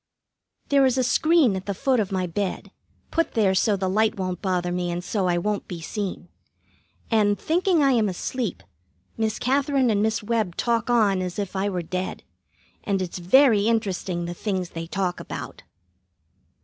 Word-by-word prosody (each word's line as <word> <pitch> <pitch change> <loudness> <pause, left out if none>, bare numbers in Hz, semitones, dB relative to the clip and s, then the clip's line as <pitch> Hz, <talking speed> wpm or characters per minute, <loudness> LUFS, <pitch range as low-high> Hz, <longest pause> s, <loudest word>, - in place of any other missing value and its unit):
There 280 -1 +4
is 260 0 0
a 255 - +3
screen 300 - +3
at 190 +1 -6
the 200 - -2
foot 265 +3 +1
of 205 -2 -1
my 185 -1 0
bed, 185 +2 -3 0.4
put 330 0 0
there 205 -4 +3
so 205 +2 +2
the 190 0 -1
light 215 +3 +1
won't 185 -2 -3
bother 180 -2 -1
me 180 0 -1
and 175 +1 -3
so 190 +1 -1
I 175 -1 +2
won't 205 +4 -2
be 175 -3 -6
seen. 195 +3 -5 0.8
And, 205 -2 +3
thinking 345 -1 +2
I 275 - +4
am 225 -5 +2
asleep, 215 +3 -3 0.5
Miss 220 -1 -1
Katherine 270 -1 +1
and 205 -1 +1
Miss 220 0 0
Webb 215 -5 -1
talk 235 -1 0
on 210 -6 +3
as 180 +1 -4
if 200 -2 -4
I 195 +1 0
were 180 -3 -3
dead; 185 +3 -4 0.6
and 200 -2 0
it's 180 -1 -4
very 215 +3 +5
interesting 190 -6 -1
the 175 - -4
things 185 -1 -3
they 165 0 -6
talk 185 0 -2
about. - - -7
205 Hz, 180 wpm, -24 LUFS, 185-230 Hz, 0.8 s, very